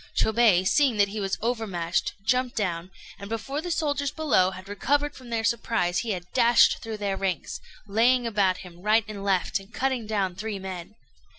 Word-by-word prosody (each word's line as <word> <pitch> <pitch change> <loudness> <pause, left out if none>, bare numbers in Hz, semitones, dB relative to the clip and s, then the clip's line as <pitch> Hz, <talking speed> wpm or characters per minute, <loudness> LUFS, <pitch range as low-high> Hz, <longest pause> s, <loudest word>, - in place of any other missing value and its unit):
Chôbei, 215 -5 +4
seeing 270 -3 +3
that 200 -1 +3
he 215 +2 -5
was 195 -1 -1
overmatched, 195 -8 -1
jumped 250 +1 +1
down, 180 -4 -2 0.3
and 200 - -8
before 225 +7 -3
the 355 - -5
soldiers 285 -4 0
below 260 -12 +2
had 185 0 -10
recovered 285 +8 0
from 255 -4 -13
their 230 -1 -1
surprise 225 -6 0
he 235 - -4
had 180 -4 -3
dashed 235 -1 +5
through 225 -1 -5
their 200 -2 -2
ranks, 190 -3 -3 0.3
laying 235 +4 +3
about 200 -5 +2
him 175 -1 -13
right 215 +2 +3
and 205 -2 -7
left, 195 +1 +1
and 195 +2 -16
cutting 260 -4 -1
down 200 -4 0
three 210 +1 -4
men. 190 +1 -7
215 Hz, 185 wpm, -26 LUFS, 190-240 Hz, 0.3 s, dashed